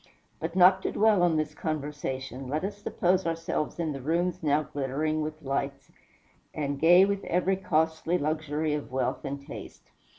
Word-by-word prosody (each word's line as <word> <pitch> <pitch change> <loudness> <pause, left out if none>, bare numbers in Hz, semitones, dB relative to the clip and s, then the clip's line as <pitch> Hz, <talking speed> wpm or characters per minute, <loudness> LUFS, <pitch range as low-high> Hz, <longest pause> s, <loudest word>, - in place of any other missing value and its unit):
But 165 +2 -4
not 190 +1 +6
to - - -2
dwell 215 -3 +4
on 170 -3 +3
this 155 0 -1
conversation, 140 -4 -4
let 150 +5 -2
us 200 +1 -3
suppose 185 -2 +1
ourselves 165 -2 -2
in 165 -2 -1
the 135 -2 -5
rooms 170 +5 0
now 150 -1 +2
glittering 145 +3 -2
with 155 +1 -5
lights, 140 0 -3 0.6
and 140 -2 -2
gay 175 +4 +7
with 200 0 -2
every 180 +2 +1
costly 160 -1 +1
luxury 155 0 -1
of 150 -3 -4
wealth 130 0 -1
and 140 0 -5
taste. - - -10
155 Hz, 165 wpm, -28 LUFS, 145-175 Hz, 0.6 s, gay